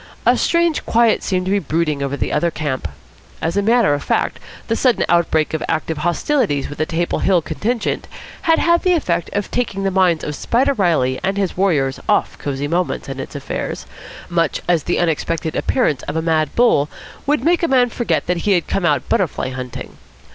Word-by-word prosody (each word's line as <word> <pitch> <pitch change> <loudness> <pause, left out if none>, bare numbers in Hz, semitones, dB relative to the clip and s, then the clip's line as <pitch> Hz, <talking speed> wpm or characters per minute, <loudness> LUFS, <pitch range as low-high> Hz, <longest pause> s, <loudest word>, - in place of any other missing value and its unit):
A - - +5
strange 335 -2 +1
quiet 230 -1 +3
seemed 185 -2 -1
to 190 - -1
be 200 - +3
brooding 155 -3 -1
over 140 0 -2
the - - -2
other 170 +3 +2
camp. 150 -5 -3 0.5
As 165 +2 -2
a 200 - +3
matter 225 -5 +3
of 145 - -1
fact, - - 0 0.3
the 225 - +1
sudden 250 0 +2
outbreak 165 -3 +2
of 160 - -1
active 160 -1 -1
hostilities 170 - 0
with 145 - -9
the 155 - 0
Table 170 +1 -1
Hill 190 -2 +3
contingent 220 +10 -2 0.4
had 325 - +6
had 340 0 +3
the 365 - +3
effect 175 - 0
of 205 -1 -2
taking 210 -5 -1
the 195 - +1
minds 180 -4 +2
of 150 - -3
Spider 250 - +1
Reilly 160 - +1
and 195 +1 0
his 195 -3 -1
warriors 150 -9 +1
off - - +2
Cosy 140 0 -3
Moments 175 +1 -1
and 135 -1 -6
its 135 - -9
affairs, 140 - -4 0.4
much 165 -3 0
as 170 -5 +2
the - - 0
unexpected 165 -1 -1
appearance 155 - +1
of - - -3
a 160 - +1
mad 160 -2 0
bull 230 -12 +3 0.4
would 295 +1 +1
make 345 +2 +3
a 335 - +2
man 250 -3 +3
forget 240 - -1
that 180 - 0
he 200 +4 +1
had 175 -3 +1
come 195 - -1
out - - +1
butterfly 190 - 0
hunting. 130 -1 -7
175 Hz, 200 wpm, -19 LUFS, 155-225 Hz, 0.5 s, had